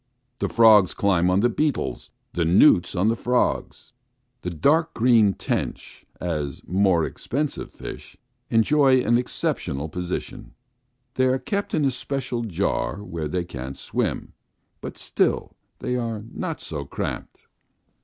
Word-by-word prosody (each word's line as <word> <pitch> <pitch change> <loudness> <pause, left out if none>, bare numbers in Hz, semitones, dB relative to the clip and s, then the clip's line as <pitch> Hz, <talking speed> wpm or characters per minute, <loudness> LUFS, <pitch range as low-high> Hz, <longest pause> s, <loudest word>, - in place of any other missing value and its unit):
The - - -1
frogs 110 -5 +6
climb 90 -3 +2
on 95 +2 +3
the 120 - +4
beetles, 150 +3 -1 0.2
the 85 - 0
newts 90 - +5
on 95 +4 +2
the 115 - +2
frogs. 125 +1 -1 0.5
The 90 - -3
dark 150 - +2
green 115 -5 +4
tench, - - -4
as 75 -6 -3
more 90 -3 +2
expensive 145 +3 -3
fish, - - -9 0.3
enjoy 130 +3 +4
an 120 0 +3
exceptional 80 - -2
position; 90 +2 -5 0.6
they 130 0 +2
are 130 +1 +2
kept 200 +8 -2
in 155 -2 +2
a 135 - +2
special 125 -1 -3
jar 100 +1 -1
where 80 -6 -4
they 90 +4 -2
can't 65 -4 -7
swim, - - -3 0.5
but - - -7
still - - 0 0.2
they 125 - -2
are 115 -3 -3
not 165 -4 -4
so 75 -3 -5
cramped. 70 - -6
110 Hz, 135 wpm, -24 LUFS, 90-130 Hz, 0.6 s, frogs